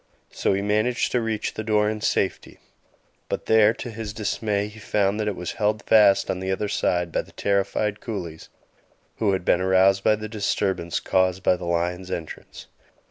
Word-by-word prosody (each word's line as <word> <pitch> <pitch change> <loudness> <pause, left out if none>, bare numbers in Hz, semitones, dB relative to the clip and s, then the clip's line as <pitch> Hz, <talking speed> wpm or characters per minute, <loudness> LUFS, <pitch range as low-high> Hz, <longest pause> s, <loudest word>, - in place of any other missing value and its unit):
So - - 0
he 100 +1 -1
managed 110 +4 +1
to 125 - +1
reach 110 -2 -2
the 110 - -5
door 105 -1 +2
in 110 0 -3
safety; 100 -3 -1 0.7
but - - -3
there, 110 -1 +5
to 120 - -7
his 110 -1 -6
dismay, 105 -1 -1
he 105 +1 -12
found 105 0 0
that 105 - -1
it 105 - -1
was 90 -1 -5
held 105 0 +1
fast 105 -3 +4
on 90 - -3
the 95 0 -3
other 105 +2 -1
side 90 -3 0
by - - 0
the - - -18
terrified 100 +1 0
coolies, 90 -8 -6 0.7
who 105 -3 +1
had 95 -2 -2
been 90 - +3
aroused 95 +1 +3
by 110 - +4
the 110 0 -6
disturbance 100 -4 -1
caused 95 0 +1
by 90 - +4
the 90 0 -7
lion's 90 +2 -2
entrance. 80 -4 -7
100 Hz, 190 wpm, -24 LUFS, 95-110 Hz, 0.7 s, there